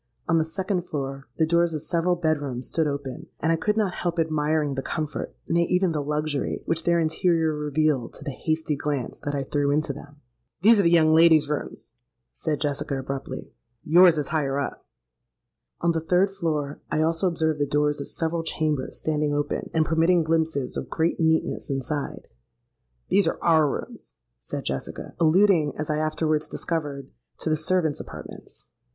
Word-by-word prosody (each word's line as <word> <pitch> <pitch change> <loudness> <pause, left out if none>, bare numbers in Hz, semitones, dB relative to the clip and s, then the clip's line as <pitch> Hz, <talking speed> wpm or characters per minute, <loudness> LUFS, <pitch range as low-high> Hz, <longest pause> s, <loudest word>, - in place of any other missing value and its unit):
On 165 -1 +3
the 160 - +1
second 185 +1 -2
floor, 135 -2 -4
the 160 - +3
doors 170 0 +2
of 150 - -4
several 170 +3 +1
bed 160 -3 0
rooms 130 -3 -4
stood 160 -1 +1
open; 140 -2 -5
and 160 - +1
I - - +4
could 210 +6 0
not 205 -5 +1
help 175 -1 -2
admiring 155 -2 +1
the 135 - -2
comfort—nay, 155 +3 -2
even 180 0 +2
the 150 -2 -1
luxury, 150 0 -2
which 165 0 -1
their 170 0 +3
interior 160 0 +2
revealed 150 -4 0
to - - -12
the 145 - -4
hasty 155 +2 -1
glance 140 -3 -3
that 145 0 -3
I 140 - -1
threw 145 +1 0
into 150 0 +1
them. 145 +2 -12 0.5
'These 225 +1 +7
are - - +6
the 170 - +4
young 160 -2 +5
ladies' 160 -2 +6
rooms,' 150 - -5 0.4
said 155 -3 -2
Jessica 145 -1 -1
abruptly: 135 0 -5 0.3
'yours 175 +1 +6
is 150 - -2
higher 140 -3 0
up.' 140 - -4 1.0
On 170 - +3
the 165 -1 -1
third 180 +4 +2
floor 155 -7 -2
I 155 - +1
also 165 +3 +1
observed 160 -3 0
the 145 - +1
doors 145 0 +1
of - - -5
several 165 0 -1
chambers 155 -4 -2
standing 150 -1 0
open, 145 0 -2
and 160 -1 +2
permitting 165 +2 +3
glimpses 160 -4 0
of - - -5
great 165 +1 0
neatness 160 -1 +1
inside. 140 +2 -3 0.8
'These 200 +1 +4
are - - 0
our 160 -3 +4
rooms,' - - -7 0.3
said - - -6
Jessica—alluding, 160 - +1
as 155 0 -2
I 150 - 0
afterwards 155 0 0
discovered, 145 -5 -4 0.3
to 160 - -1
the - - +4
servants' 160 -1 0
apartments. - - -10
155 Hz, 175 wpm, -25 LUFS, 145-165 Hz, 1.0 s, These